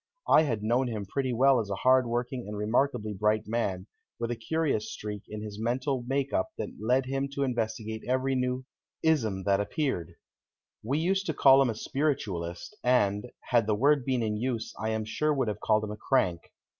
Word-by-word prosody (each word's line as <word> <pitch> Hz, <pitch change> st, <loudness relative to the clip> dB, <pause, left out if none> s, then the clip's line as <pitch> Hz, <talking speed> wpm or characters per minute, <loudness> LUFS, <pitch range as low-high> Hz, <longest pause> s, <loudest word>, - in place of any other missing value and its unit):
I -, -, +7 dB
had 115 Hz, -9 st, -1 dB
known 120 Hz, +4 st, +2 dB
him 110 Hz, -4 st, -4 dB
pretty 130 Hz, +6 st, -2 dB
well 130 Hz, +2 st, +4 dB
as 105 Hz, -3 st, -3 dB
a 100 Hz, -, -1 dB
hard 130 Hz, +3 st, +4 dB
working 120 Hz, 0 st, -2 dB
and 105 Hz, 0 st, -5 dB
remarkably 110 Hz, 0 st, 0 dB
bright 105 Hz, +2 st, +1 dB
man, 100 Hz, -5 st, -2 dB, 0.3 s
with 115 Hz, 0 st, -2 dB
a -, -, -1 dB
curious 135 Hz, -1 st, -1 dB
streak 105 Hz, -1 st, -6 dB
in 105 Hz, 0 st, -6 dB
his 105 Hz, -1 st, -7 dB
mental 130 Hz, +2 st, -1 dB
make 135 Hz, +1 st, -1 dB
up 95 Hz, -, +1 dB
that -, -, -3 dB
led 125 Hz, +5 st, +2 dB
him 135 Hz, +1 st, -2 dB
to 140 Hz, -, -1 dB
investigate 110 Hz, -3 st, -2 dB
every 130 Hz, +1 st, +1 dB
new 125 Hz, 0 st, -1 dB, 0.4 s
"ism" 110 Hz, -12 st, +1 dB
that 100 Hz, 0 st, +2 dB
appeared. 115 Hz, -, -2 dB, 0.7 s
We 130 Hz, +7 st, -1 dB
used 190 Hz, +4 st, 0 dB
to 160 Hz, -, -1 dB
call 135 Hz, 0 st, +7 dB
him 135 Hz, -, +3 dB
a 115 Hz, -, -2 dB
Spiritualist, 105 Hz, -, -2 dB
and, 115 Hz, -2 st, +2 dB, 0.2 s
had 115 Hz, -3 st, +4 dB
the 105 Hz, -, +2 dB
word 140 Hz, +4 st, +3 dB
been 125 Hz, -2 st, 0 dB
in 105 Hz, -1 st, -1 dB
use, 115 Hz, -1 st, -2 dB
I 110 Hz, +1 st, -1 dB
am 110 Hz, -1 st, -1 dB
sure 150 Hz, +8 st, 0 dB
would 130 Hz, -4 st, 0 dB
have 105 Hz, -, -2 dB
called 110 Hz, 0 st, +2 dB
him 105 Hz, -, -4 dB
a 105 Hz, -, -6 dB
crank. 95 Hz, -9 st, 0 dB
120 Hz, 200 wpm, -28 LUFS, 105-135 Hz, 0.7 s, I